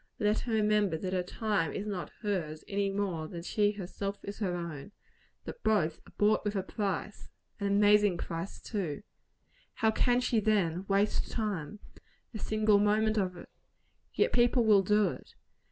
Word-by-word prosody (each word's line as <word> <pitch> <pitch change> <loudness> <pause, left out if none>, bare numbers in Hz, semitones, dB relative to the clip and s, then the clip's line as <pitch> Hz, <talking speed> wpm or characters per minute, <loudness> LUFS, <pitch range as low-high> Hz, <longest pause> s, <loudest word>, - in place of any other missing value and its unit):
Let 210 -1 +1
her 235 - -4
remember 210 -5 +2
that 185 +3 -4
her 185 - +1
time 190 -3 -1
is 205 - -4
not 195 -4 -4
hers, 165 -7 -2
any 200 0 0
more 195 -5 -2
than 170 +1 -7
she 205 +3 +1
herself 200 +1 -5
is 200 +1 -7
her 185 -5 -1
own; 170 +1 -6 0.5
that - - -8
both 170 -8 +1
are - - -16
"bought 210 +1 +3
with 210 0 -2
a 190 - 0
price" 205 +1 -4 0.3
an 200 - -1
amazing 205 -1 +4
price, 170 +3 -5
too! 185 -9 -4 0.7
How 220 0 +2
can 245 +2 +2
she, 245 -2 +1
then, 195 -4 +1
waste 200 +1 +1
time 210 -5 -3 0.6
a 215 - -5
single 215 -1 +3
moment 215 +1 +2
of 180 -2 -2
it? - - -11 0.6
Yet - - +1
people 240 0 +4
will 210 -3 +6
do 210 0 +3
it. - - -10
205 Hz, 170 wpm, -30 LUFS, 180-215 Hz, 0.7 s, will